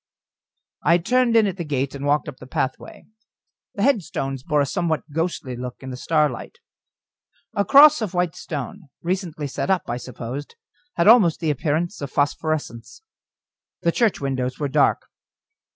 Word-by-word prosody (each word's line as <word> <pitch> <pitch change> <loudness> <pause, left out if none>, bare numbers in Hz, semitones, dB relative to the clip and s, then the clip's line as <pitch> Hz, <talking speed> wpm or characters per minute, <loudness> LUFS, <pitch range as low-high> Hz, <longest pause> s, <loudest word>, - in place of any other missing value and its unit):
I 170 +3 +4
turned 235 +6 +2
in 225 -2 +6
at 195 -2 -2
the 175 - -3
gate, 140 -3 -2
and 140 0 -4
walked 145 +1 +1
up 145 -3 -7
the 130 - -12
pathway. 130 0 -4 0.7
The 200 - -1
headstones 160 - 0
bore 150 0 0
a - - +2
somewhat 165 +1 -1
ghostly 160 -5 -2
look 125 0 -6
in 130 - -6
the - - -5
starlight. 150 -1 -1 1.0
A 200 - +1
cross 280 +2 +7
of 200 -4 -3
white 175 -2 0
stone, 155 +3 -6
recently 175 -4 -3
set 140 - -3
up, 190 -2 +2
I 120 - -2
supposed, 125 +3 -7 0.4
had 170 - +2
almost 210 -8 +6
the 160 -3 0
appearance 160 - -2
of 140 - -4
phosphorescence. 145 - -2 0.8
The 170 - +3
church 225 +2 +1
windows 130 -2 -2
were 145 - -1
dark. 145 +1 +2
155 Hz, 160 wpm, -22 LUFS, 135-180 Hz, 1.0 s, cross